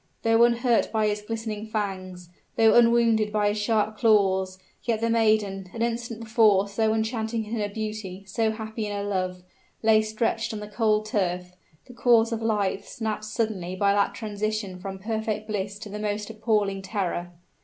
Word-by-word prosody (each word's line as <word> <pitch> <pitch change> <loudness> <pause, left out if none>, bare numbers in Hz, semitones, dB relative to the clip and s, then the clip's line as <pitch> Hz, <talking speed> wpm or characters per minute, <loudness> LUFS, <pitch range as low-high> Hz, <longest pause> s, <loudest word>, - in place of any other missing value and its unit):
Though 225 +1 +5
unhurt 240 0 +2
by 220 -1 +1
his 210 0 0
glistening 220 0 -5
fangs 185 -4 -4 0.3
though 225 -1 +5
unwounded 230 -2 +4
by 210 -1 +2
his 210 +1 -1
sharp 215 0 +1
claws, 190 -4 +3 0.3
yet 230 -2 0
the 230 0 0
maiden 215 -4 +1
an 230 - -1
instant 235 -1 -3
before 215 -3 +4
so 220 +2 +1
enchanting 220 0 -1
in 215 - -7
her 205 -1 -1
beauty, 210 -3 -5
so 220 +3 0
happy 220 0 -4
in 205 0 -3
her 200 - -2
love 185 -2 -2 0.4
lay 220 0 +5
stretched 225 +1 -1
on 215 - -4
the 210 - -7
cold 215 0 +1
turf, 180 -4 -1 0.3
the 250 - -13
cords 235 -1 +4
of 230 0 -2
life 205 -3 0
snapped 215 -1 -4
suddenly 215 -5 -2
by 200 +1 +3
that 200 0 +1
transition 210 -3 -3
from 190 +1 -6
perfect 215 +1 -3
bliss 200 -2 -3
to 210 0 -9
the 210 +1 -6
most 210 0 -3
appalling 210 -3 0
terror! 185 -3 -3
215 Hz, 175 wpm, -26 LUFS, 200-225 Hz, 0.4 s, Though